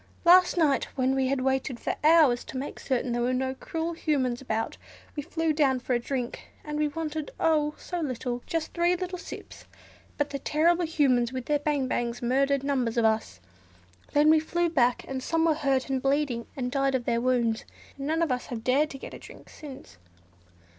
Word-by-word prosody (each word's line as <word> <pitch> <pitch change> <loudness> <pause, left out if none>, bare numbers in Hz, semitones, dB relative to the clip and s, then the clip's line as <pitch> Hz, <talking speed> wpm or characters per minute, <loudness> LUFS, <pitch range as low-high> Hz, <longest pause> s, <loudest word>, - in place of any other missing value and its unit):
Last 360 +1 +6
night, 295 -5 +3
when 260 0 +1
we 265 -1 +1
had 270 0 0
waited 265 -2 -1
for - - -2
hours, 305 -6 +5
to 265 - -7
make 275 +3 -5
certain 255 -2 -1
there 240 0 0
were 250 +1 +1
no 260 +1 -1
cruel 325 +5 -4
Humans 270 -7 -1
about, 225 -3 -2 0.4
we 295 - -2
flew 325 +1 -1
down 275 -4 +2
for 250 +1 -2
a 240 - +2
drink—and 270 +4 -5
we 300 - +2
wanted, 310 0 -4
oh! 300 -2 +2
so 355 - -5
little, 250 -4 -3
just 325 -1 -2
three 345 +1 +2
little 365 0 -4
sips; - - -10 0.5
but 290 -1 -1
the 280 - -3
terrible 335 +5 +2
Humans, 265 -7 +2
with 255 -2 -4
their 295 -1 +1
'bang 290 -3 0
bangs,' 240 -1 -2
murdered 275 +2 +2
numbers 255 -5 0
of 230 - +3
us. 220 - 0 0.7
Then 295 +1 +5
we 315 - +6
flew 340 +2 -1
back, 250 -5 +2
and 265 -1 -4
some 325 +4 +1
were 325 - +4
hurt 275 -4 0
and 265 -2 -1
bleeding, 275 -4 0
and 250 -2 -2
died 275 0 +1
of 245 -2 -2
their 235 -1 +1
wounds, 240 -3 +1 0.3
and 275 0 -5
none 325 +2 +1
of 320 - 0
us 250 0 -2
have 225 -2 -6
dared 275 +5 +2
to 275 - -8
get - - -9
a - - -8
drink - - -14
since." 260 - -11
275 Hz, 200 wpm, -27 LUFS, 250-310 Hz, 0.7 s, Last